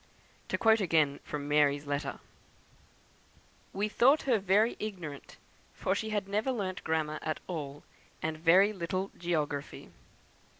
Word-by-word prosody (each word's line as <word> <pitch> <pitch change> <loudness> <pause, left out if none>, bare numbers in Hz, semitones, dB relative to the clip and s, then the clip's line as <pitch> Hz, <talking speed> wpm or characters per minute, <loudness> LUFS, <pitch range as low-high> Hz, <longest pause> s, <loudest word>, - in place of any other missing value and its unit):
To - - -1
quote 220 -1 +4
again 155 -6 +2
from 145 -1 -5
"Mary's" 145 -1 +3
letter: 145 0 -3 1.5
"We 205 +2 -1
thought 265 +7 +4
her 245 -5 +2
very 200 +4 +3
ignorant, 175 -10 -7 0.4
for 190 - 0
she 220 +2 -2
had 205 -2 -1
never 210 +6 0
learnt 195 -6 -3
grammar 155 -1 -1
at 155 - -3
all, 145 -4 -6 0.4
and 160 0 -2
very 180 +6 +5
little 185 +1 -3
geography." 150 -5 -3
175 Hz, 130 wpm, -31 LUFS, 150-205 Hz, 1.5 s, very